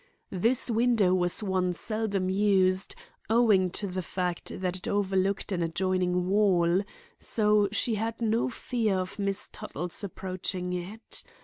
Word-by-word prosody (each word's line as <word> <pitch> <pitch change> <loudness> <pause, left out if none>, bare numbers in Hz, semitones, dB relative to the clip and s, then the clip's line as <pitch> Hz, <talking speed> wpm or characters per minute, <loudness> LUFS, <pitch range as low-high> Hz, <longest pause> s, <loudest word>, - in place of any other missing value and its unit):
This 230 +7 +1
window 230 -5 +3
was 180 +3 +1
one 185 -2 0
seldom 210 -1 -2
used, 190 -1 +2 0.3
owing 220 -5 +4
to 200 - -4
the 185 -1 -3
fact 180 0 -3
that 185 -1 -1
it 185 - -6
overlooked 195 0 0
an 180 -3 -1
adjoining 180 +1 0
wall, 185 -3 +3 0.4
so 210 -2 +2
she 225 +2 +1
had 225 +2 -2
no 230 +1 +1
fear 230 -4 -1
of 185 +3 -4
Miss 200 0 -1
Tuttle's 175 +6 -5
approaching 185 -1 -3
it. 185 +6 -6
190 Hz, 135 wpm, -28 LUFS, 180-215 Hz, 0.4 s, owing